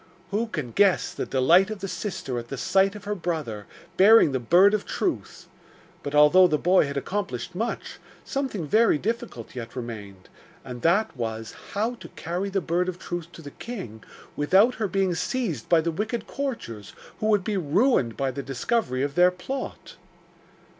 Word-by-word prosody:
Who 220 +4 0
can 125 - -5
guess 200 - +3
the - - -4
delight 165 +10 +4
of 215 - -4
the 195 0 -5
sister 175 - -4
at 120 - -9
the 135 - -6
sight 195 +7 +2
of 210 - -9
her 210 - -2
brother, 155 - -4 0.3
bearing 205 -5 +7
the 130 - -1
Bird 180 - +5
of 215 - 0
Truth? - - -3 0.5
But 145 +1 -4
although 150 +5 +7
the 155 -3 +1
boy 180 -1 +3
had 140 0 -4
accomplished 180 - -3
much, 225 +6 -4 0.3
something 265 - -3
very 220 +3 +4
difficult 205 - -4
yet 115 -1 -7
remained, 105 -6 -8 0.4
and 125 -1 -7
that 195 +5 +2
was 115 -3 -4 0.2
how 220 +4 0
to - - -10
carry 180 +4 -3
the 195 0 -1
Bird 180 +2 0
of 180 - -5
Truth 175 -2 -6
to 165 - -11
the 145 - -9
king 130 - -8 0.3
without 190 +11 +4
her 210 - +2
being 190 -1 0
seized 175 - -2
by 170 -2 +5
the 170 +1 -1
wicked 215 +6 -3
courtiers, 225 - -5 0.3
who 215 - -1
would 210 -3 +3
be 210 +2 -2
ruined 170 - +2
by 135 -1 0
the 140 - -5
discovery 135 - -1
of 140 0 -2
their 180 +2 +5
plot. 220 +10 -7
175 Hz, 180 wpm, -25 LUFS, 135-205 Hz, 0.5 s, bearing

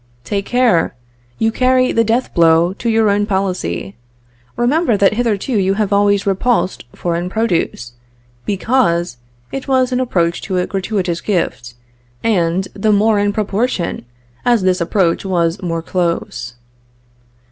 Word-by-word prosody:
"Take 200 - -3
care, 245 -9 +2 0.4
you 225 0 +1
carry 255 +1 +2
the 230 - +2
death 230 +3 0
blow 165 +1 +4
to 235 +4 -3
your 225 -1 +3
own 205 +1 +1
policy. 180 - -2 0.6
Remember 245 -1 +2
that 200 0 +3
hitherto 230 +1 -1
you 195 0 +1
have 210 -1 0
always 200 0 +3
repulsed 195 - 0
foreign 175 +1 -2
produce, 180 - -1 0.5
because 185 - 0 0.3
it 270 0 -5
was 260 -1 +2
an 250 - 0
approach 175 -9 0
to 190 -3 -3
a 180 - +1
gratuitous 190 -3 -2
gift, 130 - -2 0.5
and 185 -3 +1
the 215 +2 +1
more 210 +1 +3
in 205 0 +1
proportion 205 - -2 0.4
as 240 -5 +2
this 185 -1 +1
approach 170 0 +1
was 175 -1 0
more 165 -2 -3
close. 170 -9 -2
195 Hz, 135 wpm, -17 LUFS, 175-225 Hz, 0.6 s, blow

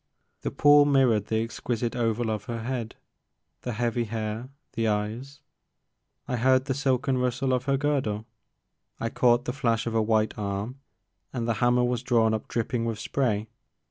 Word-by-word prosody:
The - - -2
pool 145 0 +6
mirrored 130 -7 +3
the 110 0 +1
exquisite 120 +1 -3
oval 115 -1 0
of 105 -1 -3
her 115 -1 -4
head, 120 -2 -3 0.7
the 125 - -4
heavy 120 +1 0
hair, 110 +2 -4 0.2
the 115 0 0
eyes. 110 +7 -3 0.9
I 125 - -1
heard 130 +2 +3
the 135 - 0
silken 135 -1 +1
rustle 125 +1 0
of 125 0 0
her 135 -1 +2
girdle, 130 -7 -1 0.7
I 115 - -1
caught 120 0 +3
the 125 - -2
flash 115 -4 0
of 115 - -2
a 115 - +3
white 110 0 +1
arm, 105 +6 -3 0.5
and 120 -3 -3
the 115 - +2
hammer 120 0 +4
was 125 -1 0
drawn 115 -3 +3
up 110 - -3
drip 115 -2 -2
ping 120 -2 -1
with 115 -2 -2
spray. 110 -2 -1
120 Hz, 175 wpm, -27 LUFS, 110-130 Hz, 0.9 s, pool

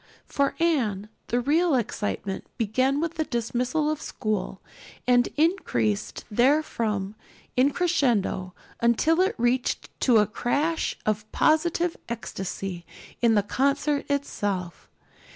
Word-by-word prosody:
For 280 -1 0
Anne 225 - +1 0.2
the 240 - +1
real 305 +5 +2
excitement 205 -4 -2
began 255 +6 +1
with 330 +1 -2
the 315 - +2
dismissal 250 +4 -1
of 310 - -4
school 210 -3 -3 0.5
and 245 -1 +4
increased 205 - 0
therefrom 230 -5 +1 0.4
in 255 +3 +4
crescendo 245 - 0 0.2
until 270 +9 +3
it 380 - +1
reached 245 +2 0
to 245 -4 +4
a 210 - +5
crash 290 +10 -1
of 215 0 -1
positive 335 +2 +2
ecstasy 195 -5 -5 0.4
in 230 -2 +4
the 205 - +3
concert 280 +6 0
itself. 205 -11 -2
245 Hz, 115 wpm, -26 LUFS, 210-300 Hz, 0.5 s, a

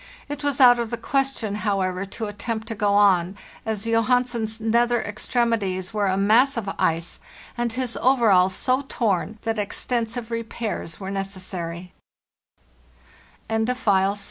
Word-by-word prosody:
It 290 0 -6
was 285 -1 0
out 245 -2 +7
of 235 -1 -2
the 235 - -3
question, 270 -7 -1
however, 190 -2 -1
to 220 +3 -5
attempt 220 +2 -4
to - - -2
go 205 -1 +1
on, 190 -2 +3 0.3
as 220 -1 -2
Johansen's 230 -1 +1
nether 235 +2 +2
extremities 205 -3 -1
were 205 -2 +1
a 190 0 +1
mass 235 +7 +4
of 220 -3 -3
ice 165 +1 0 0.4
and 240 -1 -1
his 250 0 -2
overalls 205 -8 +4
so 255 +1 +1
torn 215 -1 -1
that 225 -1 -1
extensive 230 +2 -2
repairs 225 -6 -4
wer 190 -1 -5
225 Hz, 125 wpm, -23 LUFS, 200-240 Hz, 0.4 s, out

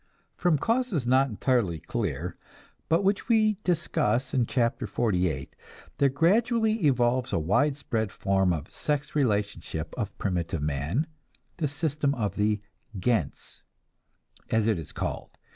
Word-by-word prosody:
From 175 -4 +2
causes 225 - 0
not 130 +2 +4
entirely 110 -6 +1
clear, 85 - -3 0.5
but 165 +4 +3
which 200 +4 +1
we 215 -3 +3
discuss 130 - 0
in 125 -3 +2
Chapter 120 -2 0
XLVIII, 90 -8 0 0.5
there 140 - +5
gradually 220 - +2
evolves 125 -1 +2
a - - +1
widespread 110 - 0
form 95 -3 +1
of 80 -1 -4
sex 145 -1 -2
relationship 100 - -1
of 105 -4 -3
primitive 85 -5 -2
man, 75 - 0 0.5
the 160 -4 0
system 145 -1 0
of 105 -5 -2
the 105 0 +1 0.4
"gens," 95 - -1 0.9
as 110 -1 +2
it 110 -6 +2
is 80 - -8
called. - - -5
120 Hz, 125 wpm, -27 LUFS, 95-150 Hz, 0.9 s, there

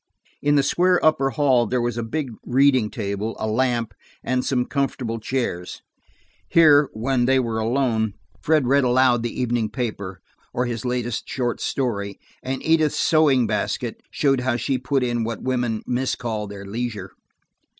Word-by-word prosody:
In 145 0 +2
the 140 - +4
square 180 +5 +3
upper 135 -4 +3
hall 135 -5 +2
there 125 +3 0
was 120 -1 -1
a 120 - -2
big 135 +3 -3
reading 130 -3 +3
table, 105 -1 -3
a - - -2
lamp, 115 0 0 0.3
and 130 0 0
some 125 -2 0
comfortable 130 -5 -2
chairs. 110 -7 -3 0.7
Here, 150 -4 +6
when 120 +3 0
they 130 +1 +3
were 115 -3 -1
alone, 110 -3 0 0.3
Fred 155 - +2
read 140 +2 +3
aloud 125 -1 +3
the 120 +1 -4
evening 120 -3 0
paper, 100 -7 -4 0.4
or 125 - +1
his 120 -1 -4
latest 120 -1 -2
short 120 -3 -2
story, 100 -7 -2 0.2
and 130 +1 -4
Edith's 160 -2 +3
sewing 145 -6 +4
basket - - -2
showed 135 -2 +1
how 125 0 0
she 125 +3 -1
put 130 +1 0
in 120 -2 0
what 115 -2 -4
women 120 -4 -1
miscall 120 -4 -2
their 100 0 -9
leisure. 115 +2 -4
125 Hz, 160 wpm, -23 LUFS, 115-135 Hz, 0.7 s, Here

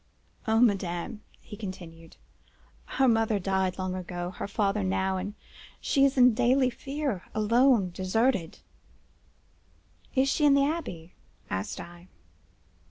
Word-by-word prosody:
"'O 220 0 +3
madame!' 200 -1 0 0.2
he 210 - -10
continued, 175 -5 -9 0.7
'her 270 - +1
mother 225 -2 +2
died 190 -1 -1
long 185 -1 -3
ago—her 180 0 -5
father 200 0 0
now—and 190 +1 -1 0.4
she 275 -2 +3
is 275 0 +1
in 250 -1 +6
daily 250 +2 +3
fear,—alone, 235 -4 +1
deserted—' 190 0 0 1.5
"'Is 265 +1 +3
she 295 +2 0
in 285 -1 +6
the 280 0 +4
Abbaye?' 235 - -4 0.4
asked 95 +1 -3
I. 175 +1 -11
205 Hz, 110 wpm, -28 LUFS, 185-250 Hz, 1.5 s, in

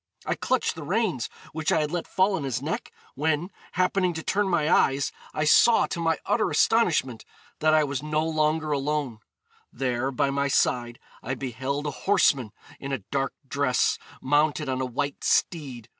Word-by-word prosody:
I - - 0
clutched 255 -1 0
the 160 - -9
reins, 180 - -1 0.2
which 160 0 -1
I 160 - +3
had 150 0 -2
let 175 -1 -3
fall 190 +2 +2
on 180 -6 -2
his 130 -3 -2
neck, 150 +5 -4 0.2
when, 160 +5 -1 0.2
happening 185 0 +1
to 160 - -5
turn 205 0 +1
my 165 -4 +1
eyes, 140 -3 +3 0.2
I 150 - -2
saw, 225 +9 +5
to 175 - -5
my 165 -1 +1
utter 205 +2 +1
astonishment, 155 - +2 0.4
that 155 0 +4
I 155 - +4
was 140 -2 -2
no 155 +1 -1
longer 155 0 0
alone: 140 -4 -1 0.5
there, 125 0 -1
by 135 +1 0
my 140 0 0
side, 120 -3 +1 0.2
I 130 +3 -3
beheld 135 +3 -3
a 150 - -1
horseman 140 - +2 0.3
in 140 - -6
a 135 -7 -3
dark 135 -1 -1
dress, 130 -2 +1 0.2
mounted 145 +2 +2
on 130 0 -1
a 130 - -1
white 140 +3 -3
steed. 135 -9 0
150 Hz, 175 wpm, -26 LUFS, 135-160 Hz, 0.5 s, saw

